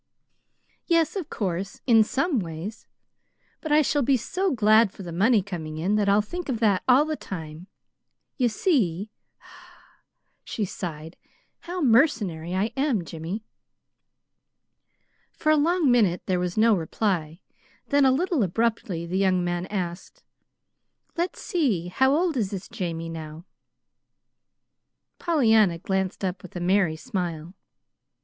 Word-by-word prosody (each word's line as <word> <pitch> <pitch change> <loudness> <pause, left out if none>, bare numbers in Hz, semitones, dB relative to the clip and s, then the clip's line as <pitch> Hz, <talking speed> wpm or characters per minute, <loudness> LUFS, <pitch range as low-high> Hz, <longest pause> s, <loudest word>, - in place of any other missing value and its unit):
"Yes, 335 0 +2
of 370 -7 -4
course, 190 -1 -3
in 225 -3 +6
some 275 +5 0
ways. 175 +5 -7 0.7
But 315 - -5
I 300 +1 +5
shall 290 +1 +1
be 270 +1 +3
so 375 - -1
glad 220 - +4
for 195 - -10
the 175 - -7
money 205 +5 +3
coming 160 -5 -6
in 180 +6 0
that 210 -1 +2
I'll 205 +1 +4
think 350 +9 -6
of 240 -4 -1
that 205 -5 +2
all 260 +4 +5
the 310 0 -2
time. 165 - -8 0.7
You 250 -4 +2
see," 215 - 0 1.3
she 215 - -3
sighed, 165 -3 -7 0.4
"how 360 +1 -5
mercenary 215 - +2
I 205 +4 0
am, 265 - 0
Jimmy." 165 +7 -6 1.9
For 310 - +1
a - - +5
long 315 -1 +2
minute 205 -8 +2
there 185 -2 0
was 180 +1 -3
no 225 +1 +5
reply; 170 -2 -2 0.5
then, 285 -1 +4
a 265 - +5
little 330 +1 +1
abruptly, 200 -3 -1
the 180 +3 -2
young 185 -2 +2
man 175 +1 -2
asked: 180 -3 -5 0.9
"Let's 345 +2 -2
see, 230 - 0
how 265 +8 +3
old 340 -1 +1
is 210 -5 0
this 195 -1 -6
Jamie 165 -2 -4
now?" 160 0 -8 1.7
Pollyanna 220 - +3
glanced 190 +2 -2
up 180 0 -3
with 185 - -13
a - - -3
merry 180 -2 +2
smile. 175 -4 -4
200 Hz, 140 wpm, -25 LUFS, 175-265 Hz, 1.9 s, in